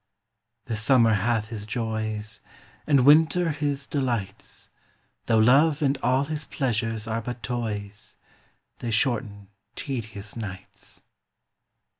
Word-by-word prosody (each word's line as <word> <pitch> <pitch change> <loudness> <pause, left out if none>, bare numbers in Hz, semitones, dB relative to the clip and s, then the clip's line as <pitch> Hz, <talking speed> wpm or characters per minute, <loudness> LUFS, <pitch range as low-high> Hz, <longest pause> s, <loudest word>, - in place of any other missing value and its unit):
The 120 -4 -3
summer 115 +1 +4
hath 110 +1 0
his 105 -2 -6
joys, 110 -1 -3 0.5
And 140 -4 +4
winter 160 +3 +5
his 145 -2 -2
delights; 120 -9 -4 0.6
Though 115 - +3
love 140 +7 +4
and 140 0 +2
all 130 +3 +2
his 150 0 -4
pleasures 115 -5 -2
are 115 0 -2
but 120 +1 -6
toys, 105 -5 -4 0.6
They 120 - -4
shorten 105 -4 -1 0.3
tedious 110 -6 -5
nights. 100 -5 -9
115 Hz, 110 wpm, -25 LUFS, 110-135 Hz, 0.6 s, winter